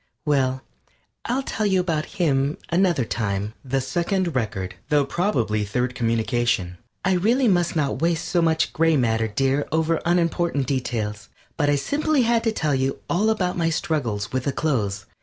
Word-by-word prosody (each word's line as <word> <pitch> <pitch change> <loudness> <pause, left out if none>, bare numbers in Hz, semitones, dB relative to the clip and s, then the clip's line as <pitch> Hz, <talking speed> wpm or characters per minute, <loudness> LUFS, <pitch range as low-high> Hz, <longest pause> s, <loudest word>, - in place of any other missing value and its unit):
Well, 130 -3 +1 0.6
I'll 255 +3 0
tell 215 -5 -1
you 190 -2 +3
about 165 -1 -2
hi 180 - +1
m 140 -1 +1
another 170 -7 +2
time. 105 -2 -2
THE 135 0 -1
SECOND 170 +6 -1
RECORD 95 -6 -2 0.2
THOUGH 145 -2 +3
PROBABLY 120 - 0
THIRD 125 +5 -1
COMMUNICATION 115 -6 0 0.3
I 190 - +3
really 235 +8 +2
must 175 -5 +2
not 145 -2 0
waste 165 -1 +1
so 175 -2 +1
much 160 -1 +1
gray 165 -1 +3
matter, 115 -3 +1
dear, 135 +6 0
over 160 +1 +1
unimportant 170 -4 +1
details. 110 -6 -3 0.3
But 145 -2 +1
I 145 - +4
simply 285 - +1
had 230 0 +2
to 225 - +3
tell 155 -8 0
you 135 0 0
all 205 +6 +2
about 185 -5 0
my 165 -1 +1
struggles 125 -11 -2
with 130 0 -1
the 140 - +1
clothes. 105 -11 -1
145 Hz, 170 wpm, -23 LUFS, 120-175 Hz, 0.6 s, I